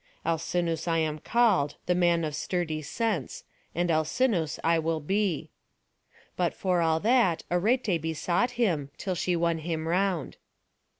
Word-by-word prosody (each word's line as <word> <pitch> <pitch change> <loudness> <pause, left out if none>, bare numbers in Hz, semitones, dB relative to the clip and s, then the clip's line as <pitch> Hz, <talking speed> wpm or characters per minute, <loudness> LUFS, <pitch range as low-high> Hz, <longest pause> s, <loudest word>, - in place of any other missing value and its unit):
Alcinous 165 0 -1
I 165 -1 +2
am 155 -1 -1
called, 205 -10 +2
the 180 - +2
man 175 -1 +2
of 150 -2 -3
sturdy 160 -1 -2
sense, 185 - -2 0.3
and 175 +1 +1
Alcinous 160 - +1
I 165 0 +3
will 160 0 -1
be." 190 +1 -1 0.8
But 175 -2 0
for 180 -2 +1
all 160 -1 +2
that, 220 -7 +3
Arete 195 -1 +1
besought 170 +8 0
him, 165 - +1
until 190 - -3
she 180 +1 0
won 170 -1 +1
him 160 0 -3
round. 180 -2 0
170 Hz, 140 wpm, -28 LUFS, 160-185 Hz, 0.8 s, I